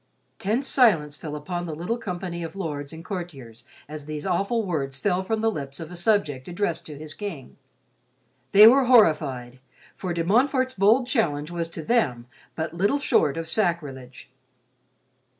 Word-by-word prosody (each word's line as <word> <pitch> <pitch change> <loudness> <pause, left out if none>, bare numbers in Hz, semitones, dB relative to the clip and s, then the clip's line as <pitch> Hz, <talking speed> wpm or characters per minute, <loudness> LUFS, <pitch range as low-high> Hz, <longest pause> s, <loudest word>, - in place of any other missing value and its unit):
Tense 230 +8 0
silence 170 - +3
fell 150 -1 -7
upon 175 +3 -4
the 155 - -5
little 180 +9 -3
company 180 -5 -5
of 165 +1 -6
lords 150 -7 -4
and 165 +1 -10
courtiers 135 - -7 0.2
as 150 0 -8
these 150 -1 -5
awful 200 +5 0
words 140 -7 -2
fell 185 +3 0
from 220 +3 -1
the 225 0 +2
lips 140 -5 -6
of 165 0 -8
a - - -8
subject, 175 -8 0
addressed 175 -1 -2
to 150 -2 -9
his 155 0 -9
king. 185 -10 -7 1.0
They 210 +2 +9
were 260 +4 +7
horrified, 150 - +3 0.4
for 185 - -4
De 170 -1 -1
Montfort's 255 - +2
bold 220 +6 +4
challenge 165 - 0
was 170 -1 -3
to 165 -1 -7
them 145 - +1 0.3
but 160 0 -3
little 200 +10 +1
short 155 - +2
of 165 0 -4
sacrilege. 150 - -2
170 Hz, 165 wpm, -25 LUFS, 150-205 Hz, 1.0 s, They